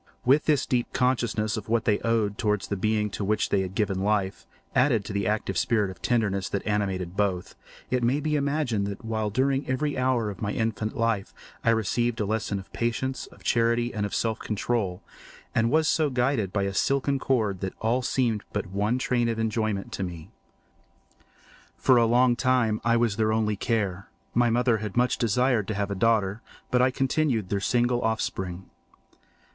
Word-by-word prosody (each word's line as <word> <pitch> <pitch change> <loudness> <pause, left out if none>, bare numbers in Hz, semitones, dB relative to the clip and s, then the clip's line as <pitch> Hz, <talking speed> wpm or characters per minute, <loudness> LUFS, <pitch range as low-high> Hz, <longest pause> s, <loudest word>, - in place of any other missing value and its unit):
With 140 +4 +4
this 150 -3 +2
deep 125 -3 -1
consciousness 120 -4 0
of 110 0 -7
what 115 -1 +1
they 105 -2 +2
owed 110 -3 0
towards 105 -3 0
the 100 - -1
being 105 +1 0
to 100 - -4
which 105 +2 0
they 100 - +2
had 95 0 -5
given 100 -3 0
life, 100 -1 -1 0.3
added 125 -6 +3
to 105 - -5
the 100 -1 -1
active 105 -4 0
spirit 105 -5 +1
of 95 - -14
tenderness 100 -5 0
that 100 - -3
animated 95 -4 -1
both, 95 -3 -1 0.4
it 125 -1 +1
may 125 +4 +2
be 150 0 -1
imagined 140 -8 0
that 100 +2 -7
while 110 -1 -1
during 135 +5 0
every 140 +2 -1
hour 125 -4 +1
of 100 - -11
my 105 -1 -1
infant 110 -1 -2
life 115 -4 -1 0.3
I - - +2
received 115 +2 +1
a 105 - 0
lesson 105 -1 -1
of 95 - -10
patience, 125 +3 -2
of - - -18
charity, 115 +1 +1
and 105 - -2
of 105 - -2
self 110 -1 0
control, 105 -3 -2 0.5
I - - +4
was 155 +6 +2
so 155 -1 +2
guided 125 -6 0
by 100 0 0
a 100 0 -2
silken 140 +5 +1
cord 110 -8 0
that 95 0 -4
all 115 +4 +1
seemed 120 -4 0
but - - -2
one 100 +6 0
train 120 -2 +1
of 115 - -2
enjoyment 110 -3 -1
to 95 - -3
me. 85 -3 -7 1.5
For 130 - +4
a 115 -1 +4
long 120 +1 +4
time 120 -4 +1
I 115 0 +3
was 115 -3 +1
their 110 -1 +2
only 110 -1 +1
care. 100 -3 -2 0.2
My 120 0 +3
mother 120 0 +2
had 105 0 -5
much 125 +1 +2
desired 120 -1 +2
to 110 - -2
have 100 0 -2
a - - 0
daughter, 105 0 +1 0.3
but 125 - +3
I 130 - +5
continued 130 -5 0
their 100 - 0
single 120 +3 +1
offspring. 95 -4 -2
110 Hz, 190 wpm, -26 LUFS, 100-125 Hz, 1.5 s, I